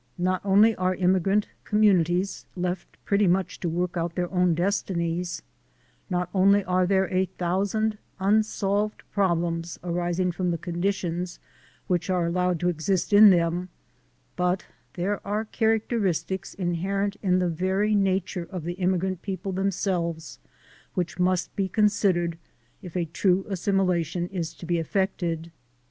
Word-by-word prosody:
Not 185 +1 0
only 205 +3 +5
are 185 0 +1
immigrant 190 +3 +2 0.2
communities 190 -3 +2
left 180 0 -4
pretty 200 0 +3
much 185 +2 0
to 175 - -2
work 175 +2 -2
out 170 0 -2
their 175 -1 -2
own 180 -2 +3
destinies; 175 -1 -1 0.7
not 180 -1 0
only 200 +1 +4
are 185 0 +1
there 190 0 +2
a 185 +1 +3
thousand 200 +5 -1 0.2
unsolved 210 +1 +1
problems 170 -3 0
arising 175 +1 0
from 180 +1 -2
the 170 - 0
conditions 175 0 -2 0.5
which 175 -1 -1
are 180 -2 +1
allowed 180 0 0
to 175 - +1
exist 175 +3 0
in 210 +1 +10
them; 175 0 +2 0.7
but 180 +1 0 0.3
there 195 +3 -1
are 210 +2 -2
characteristics 210 -6 -1
inherent 195 +3 -1
in 185 -3 +2
the 180 -1 +1
very 190 +5 0
nature 190 -3 0
of 185 -5 -5
the 175 +2 -3
immigrant 185 0 0
people 195 0 -4
themselves 180 -4 -2 0.6
which 180 -2 -2
must 180 -1 +1
be 195 -1 0
considered 185 -5 +2 0.4
if 180 -1 -6
a 175 - 0
true 185 +3 +1
assimilation 180 -3 0
is 170 -3 -4
to 155 - -10
be 170 0 0
effected. 170 -2 -2
185 Hz, 135 wpm, -26 LUFS, 175-195 Hz, 0.7 s, in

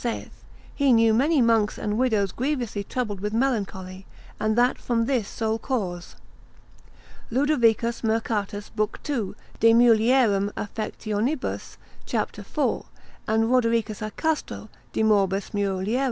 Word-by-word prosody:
18, 235 -1 -1
saith, - - -19 0.3
He 280 -3 +3
knew 225 -1 +5
many 275 +4 +3
monks 225 -2 +2
and 210 0 -2
widows 220 -6 +1
grievously 245 -6 -2
troubled 215 -3 -3
with 210 +2 -3
melancholy, 195 -6 -2 0.3
and 215 +1 0
that 245 +1 +3
from 230 -2 0
this 240 -6 0
sole 220 0 -2
cause. 190 -10 -3 1.1
Ludovicus 235 -3 +2
Mercatus, 220 -2 -1
l. 215 -1 +2 0.2
2. 235 -10 -2 0.2
de 230 0 +6
mulierum 225 -3 +4
affect. 215 +2 -5 1.0
cap. - - -1
4, - - -2 0.4
and 220 +1 +2
Rodericus 230 -4 +1
a 215 - -3
Castro, 215 - -3 0.2
de - - 0
morbis 200 -2 +2
mulier. 200 +3 0
225 Hz, 125 wpm, -25 LUFS, 205-245 Hz, 1.1 s, de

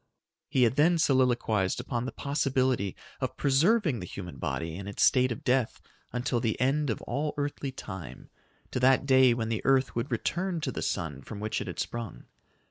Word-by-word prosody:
] - - -61
He 130 - +3
had 120 +2 +2
then 170 +4 +5
soliloquized 120 - +2
upon 120 -2 -3
the - - -4
possibility 130 -7 0 0.2
of - - -3
preserving 155 - +3
the 90 - -6
human 90 -7 -8
body 80 +5 -3
in 100 +2 -7
its 100 - -1
state 130 -1 +4
of 120 - -5
death 125 -2 +1 0.3
until 125 0 -1
the 115 -2 -1
end 140 +3 +1
of 110 - -3
all 150 +1 -2
earthly 145 -1 -3
time 95 -9 -9 0.4
to - - -1
that 130 +1 +4
day 130 -3 +5
when 115 -1 -2
the 110 -2 -1
earth 135 -1 +2
would 115 +3 -2
return 175 - -1
to - - -2
the - - -5
sun 70 -5 -2
from 100 +9 -8
which 110 +1 -2
it - - -5
had - - -6
sprung. 115 -4 -5
125 Hz, 195 wpm, -29 LUFS, 110-135 Hz, 0.4 s, then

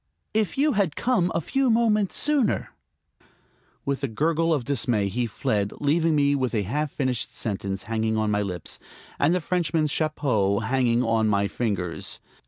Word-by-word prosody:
If 220 +4 0
you 295 +2 +3
had 195 - 0
come 230 -8 +1
a - - +2
few 270 - 0
moments 220 -4 +2
sooner...." 290 -6 +1 1.1
With 140 0 -2
a - - +2
gurgle 165 +7 +1
of 145 -6 +1
dismay 115 -7 +1
he 120 +4 -1
fled, 105 -1 -1
leaving 160 +2 +2
me 145 -1 +3
with 130 -4 -1
a 105 - +1
half 150 +10 -1
finished 130 -4 -2
sentence 100 -3 -4
hanging 110 0 -1
on 110 -1 +1
my 105 0 +1
lips 90 -5 -5 0.4
and 160 +5 +3
the - - +1
Frenchman's 160 -3 0
chapeau 125 -11 +1
hanging 125 -2 +1
on 115 -1 +2
my 100 -1 +2
fingers. 95 -8 -2
135 Hz, 165 wpm, -25 LUFS, 110-165 Hz, 1.1 s, you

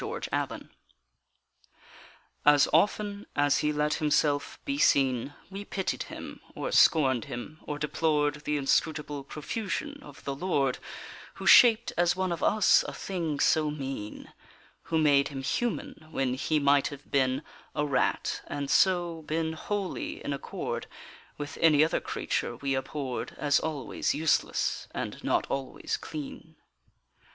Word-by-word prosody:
The - - -4
Rat - - -1 1.8
As 145 -1 +6
often 205 +4 +1
as 145 0 +3
he 150 - +1
let 150 0 0
himself 145 -1 +1
be 280 0 -2
seen 135 - +2 0.2
We 195 +1 -6
pitied 195 -2 -3
him, - - -8
or - - -3
scorned 130 -7 +4
him, 145 +6 -7
or 150 - -4
deplored 150 0 0
The 150 -1 0
inscrutable 145 0 0
profusion 220 - -4
of - - -13
the 140 - -3
Lord 140 -4 0 0.6
Who - - -8
shaped 240 0 +7
as 175 0 +3
one 185 -1 -1
of 170 - -3
us 215 -2 +4
a - - -5
thing 165 -6 -3
so 155 -1 +3
mean 135 -7 -6 0.5
Who 165 - 0
made 145 -3 +4
him 135 -2 -6
human 160 - -2
when 135 -5 -1
he 140 +4 0
might 140 -1 +3
have 145 0 -10
been 130 0 +1 0.3
A 150 - +1
rat, 140 -3 0
and 145 -1 -3
so 175 -3 +3
been 160 +1 -1
wholly 195 +4 -4
in 145 - -1
accord 140 - -4 0.5
With 145 -1 -6
any 155 -2 +6
other 160 - 0
creature - - -2
we 140 -1 -2
abhorred 130 -1 -4
As 145 -1 +3
always 145 -6 -2
useless 155 +1 0
and - - -5
not - - +1
always 135 -1 -3
clean. 150 -3 -8
150 Hz, 140 wpm, -28 LUFS, 140-165 Hz, 1.8 s, shaped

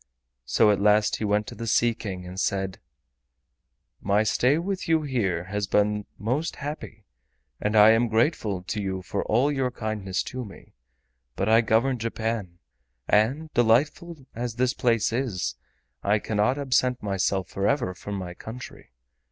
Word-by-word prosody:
So 105 - +4
at 100 - 0
last 105 +1 +3
he - - -5
went 105 0 +1
to - - -8
the 115 - -6
Sea 120 +1 +3
King 95 -5 -6
and 90 +1 -7
said: 95 -1 -1 1.2
"My 100 +2 +2
stay 125 +7 +2
with 185 +3 -3
you 160 -1 +3
here 100 - -1
has 100 +2 -3
been 105 0 +1
most 130 - -2
happy 140 -8 -7 0.6
and 105 +1 0
I 105 +1 +8
am 115 +1 +3
very 110 +1 +4
grateful 105 - -2
to 105 +3 -3
you 95 -1 -3
for 100 +3 -2
all 125 +7 +2
your 135 -3 0
kindness 110 -5 -3
to 130 0 -5
me, 100 -4 -13 0.6
but 95 - -1
I 110 +1 +6
govern 120 +3 +2
Japan, 110 -5 -3 0.5
and, 135 +10 +1
delightful 145 +6 +1
as 120 0 -4
this 125 +1 +1
place 115 -3 +1
is, 105 - -1 0.5
I 105 +2 +2
cannot 110 +5 0
absent 130 -3 +1
myself 95 -2 -1
forever 100 0 0
from 100 +3 -6
my 90 -2 -5
country. 115 +7 -10
110 Hz, 160 wpm, -26 LUFS, 100-125 Hz, 1.2 s, I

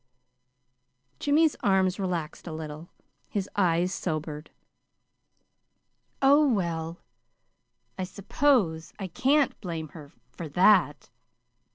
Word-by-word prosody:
Jimmy's 305 +2 +3
arms 190 -2 +2
relaxed 175 -4 -4
a - - -5
little. 155 +1 -7 0.4
His 200 -2 -2
eyes 180 -1 +2
sobered. 155 -2 -4 1.7
"Oh, 285 +2 +6
well, 170 -5 -2 1.0
I 185 - -1
suppose 195 - 0
I 195 - -5
can't 265 - +1
blame 165 -5 -5
her 150 -1 -12 0.2
for 165 -3 -7
that. 180 -3 +3
180 Hz, 90 wpm, -27 LUFS, 160-210 Hz, 1.7 s, Oh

